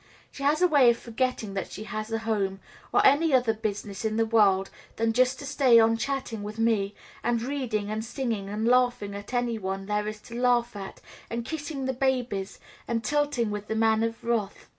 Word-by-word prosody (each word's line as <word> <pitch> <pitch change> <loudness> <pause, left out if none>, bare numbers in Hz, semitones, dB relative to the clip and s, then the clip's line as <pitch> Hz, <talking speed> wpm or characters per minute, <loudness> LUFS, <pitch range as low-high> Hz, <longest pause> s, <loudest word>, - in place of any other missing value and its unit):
She - - -11
has 295 +5 +2
a - - +7
way 285 -7 +6
of 235 - +3
forgetting 235 -3 -2
that 195 - -4
she 210 - -7
has 215 +1 -5
a 225 - +1
home, 205 -4 -1 0.3
or - - +4
any 290 +1 +5
other 245 -3 +3
business 205 -2 -4
in 220 0 -1
the 225 - +3
world 200 -4 +3 0.2
than 225 0 +1
just 255 +2 +3
to 285 - -8
stay 270 -4 +5
on 225 0 +4
chatting 235 -2 -3
with 210 +1 -6
me, 215 -3 +1 0.3
and 240 0 +1
reading, 235 -5 -2
and 215 +1 -2
singing, 230 -5 -3
and 215 +2 -2
laughing 245 -5 +2
at 200 +2 -8
any 245 -2 0
one 195 0 -4
there 210 +1 -1
is 215 0 -5
to 235 - -12
laugh 245 -3 +2
at, 195 -1 -8 0.3
and 235 0 -3
kissing 295 -2 -4
the 265 - 0
babies, 245 -7 -1 0.3
and 230 0 -1
tilting 290 -4 0
with 210 0 -5
the 220 - -2
Man 220 0 +3
of 230 0 -2
Wrath. 230 -4 -2
225 Hz, 205 wpm, -27 LUFS, 210-255 Hz, 0.3 s, a